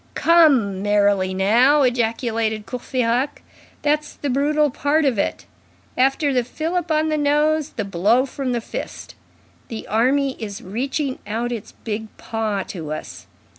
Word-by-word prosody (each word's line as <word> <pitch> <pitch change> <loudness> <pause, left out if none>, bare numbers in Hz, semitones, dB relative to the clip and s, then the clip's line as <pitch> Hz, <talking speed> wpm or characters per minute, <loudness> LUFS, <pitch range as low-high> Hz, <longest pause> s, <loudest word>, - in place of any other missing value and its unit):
"Come, 275 - +4
merrily 205 -2 +2
now!" 235 +10 +4
ejaculated 230 -3 0
Courfeyrac. 250 +1 -1 0.4
"That's 300 0 0
the 285 - -3
brutal 295 +2 +2
part 290 +4 +1
of 250 -7 +1
it. - - -2 0.5
After 270 +2 +2
the 250 -1 +2
fillip 330 +7 -3
on 310 0 +2
the 305 -1 0
nose, 300 +1 +2
the 220 - -3
blow 205 +7 +2
from 270 -1 -4
the 240 -1 -1
fist. - - -7 0.5
The 225 -2 -6
army 265 +5 +1
is 205 -3 -5
reaching 260 +7 -2
out 230 +3 -2
its 230 -4 -6
big 220 0 -3
paw 215 -3 -2
to 160 -5 -6
us. 90 -12 -7
245 Hz, 140 wpm, -21 LUFS, 215-290 Hz, 0.5 s, Come